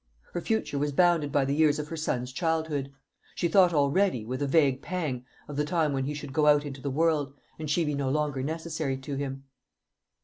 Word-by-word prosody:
Her 175 - -2
future 220 -8 -1
was 145 +1 0
bounded 165 -2 +3
by 140 -1 +2
the 140 - 0
years 150 0 +3
of 150 0 -5
her 165 - -4
son's 130 -5 -2
childhood. 160 -3 -1 0.4
She 170 - +1
thought 180 +1 +5
already, 145 - +2
with 130 +4 -4
a 145 - +1
vague 140 -3 +3
pang, 150 -9 -3 0.2
of 145 - -7
the 150 - +2
time 155 -2 +1
when 135 -1 -1
he 150 +2 -3
should 145 -2 -7
go 150 +1 +3
out 145 0 +5
into 135 -2 -7
the 140 - -2
world, 145 -1 +1 0.2
and 155 -2 -4
she 165 +2 +2
be 150 - -1
no 140 -2 -1
longer 145 -1 0
necessary 155 -1 -3
to 135 +2 -7
him. 135 -1 -4
145 Hz, 215 wpm, -28 LUFS, 135-160 Hz, 0.4 s, thought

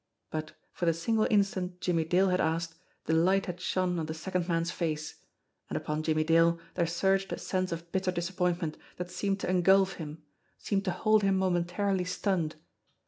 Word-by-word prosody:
But, 155 0 -4 0.2
for 175 - -2
the 165 - +3
single 215 +6 +1
instant 195 -4 +1
Jimmie 165 -3 +1
Dale 185 +4 +3
had 180 0 +2
asked, 165 +1 0 0.3
the 160 - +1
light 185 +4 +3
had 180 -1 -6
shone 180 -1 0
on 160 - -3
the 160 - -4
second 180 +1 -2
man's 170 -1 0
face 155 -3 -3 0.5
and - - -2
upon 150 0 -2
Jimmie 155 0 +1
Dale 165 +1 +4
there 170 -2 +1
surged 195 +3 +1
a - - -2
sense 185 -1 -2
of 170 0 -6
bitter 190 -1 0
disap 175 +1 -4
pointment 175 -3 0 0.2
that 180 0 -5
seemed 195 +2 -1
to - - -2
engulf 190 +1 +4
him, 155 0 -7 0.3
seemed 195 -1 -1
to 185 - +1
hold 215 +3 +3
him 195 -1 +3
JACKALS 190 -1 +2 0.2
205 180 - -13
momentarily 200 -3 +1
stunned. 180 -4 -1
180 Hz, 195 wpm, -30 LUFS, 165-190 Hz, 0.5 s, Dale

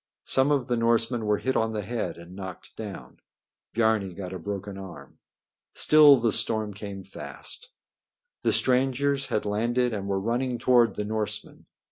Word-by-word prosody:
Some 135 +2 +2
of 140 -4 +2
the 120 0 0
Norsemen 115 0 +1
were 105 0 +3
hit 130 +4 -1
on 110 0 +1
the 105 -1 -3
head 115 +4 -3
and 85 +2 -12
knocked 95 -2 -9
down. 105 -3 -8 0.6
Biarni 110 -5 +1
got 95 -1 -6
a 95 - -5
broken 100 +2 -5
arm. 90 -8 -10 0.6
Still 150 -2 +7
the 115 -2 +1
storm 110 -1 0
came 100 -1 -7
fast. 285 - -10 0.7
The - - +2
strangers 135 +2 +1
had 105 - -1
landed 120 +4 0
and 100 -2 -4
were 100 -1 0
running 120 +4 -1
toward 120 -3 +4
the 105 - -3
Norsemen. 110 0 -4
110 Hz, 160 wpm, -26 LUFS, 100-125 Hz, 0.7 s, Still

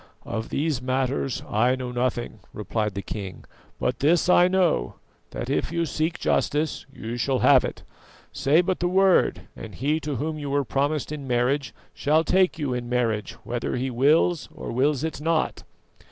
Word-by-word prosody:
"Of 110 0 -4
these 145 -3 -1
matters 130 0 -1
I 120 +4 +2
know 130 -1 -5
nothing," 120 -2 -2
replied 105 -1 -2
the 100 - -4
king; 95 -4 -7 0.3
"but 125 - -1
this 165 +5 +3
I 180 0 +6
know, 180 - +1 0.3
that - - -5
if - - -1
you 170 0 0
seek 160 +3 -1
justice 150 0 0
you 120 -3 -6
shall 130 +2 +1
have - - +7
it. - - -5 0.5
Say 150 +5 +3
but 185 0 -1
the 175 - +1
word, 190 +1 +3
and - - -9
he 150 +5 0
to 150 -2 -4
whom 155 +4 -3
you 145 -1 -4
were 140 0 +1
promised 145 +3 -1
in 145 -3 -6
marriage 125 +1 +1 0.2
shall 155 +3 +2
take 185 0 +2
you 145 -5 -2
in 120 -1 -4
marriage, 115 -4 0
whether 120 0 -3
he 130 +1 -2
wills 150 +6 +2
or - - -6
wills 135 +3 +1
it 160 -3 -3
not." 160 0 0
135 Hz, 175 wpm, -25 LUFS, 120-155 Hz, 0.5 s, have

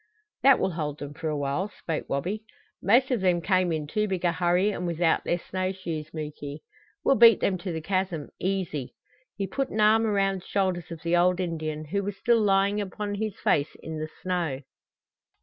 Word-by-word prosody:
"That 275 -1 +7
will 190 - 0
hold 150 -3 -3
them 145 -1 -7
for 165 +1 -5
a 150 - -1
while," 145 +8 -1
spoke 165 -6 -5
Wabi. 185 +11 -2 0.4
"Most 250 +6 +4
of 240 -6 +1
them 180 -2 +3
came 185 0 +2
in 155 -2 -1
too 210 +8 -1
big 185 -2 -2
a 170 - +4
hurry, 180 +4 +2
and 180 -3 -3
without 170 -1 +1
their 175 - 0
snow 185 +1 -3
shoes, 165 -5 -5
Muky. 150 -1 -6 0.4
We'll - - +5
beat 230 -3 +8
them 185 -2 0
to 180 +1 -4
the 160 -1 -3
chasm 185 -3 -2
easy!" 180 -8 -2 0.4
He 200 - -1
put 270 +6 -2
an 215 - -4
arm 220 +1 +5
around 195 -2 +1
the - - -16
shoulders 185 -3 0
of 165 -2 -8
the 170 +1 +2
old 180 +1 +3
Indian, 155 -3 -3
who 200 +7 -1
was 200 0 -4
still 235 -1 +3
lying 200 0 +3
upon 205 +1 -4
his 215 0 -3
face 145 +1 +1
in 160 -1 -5
the 155 0 -4
snow. 170 -7 -1
180 Hz, 200 wpm, -27 LUFS, 160-200 Hz, 0.4 s, beat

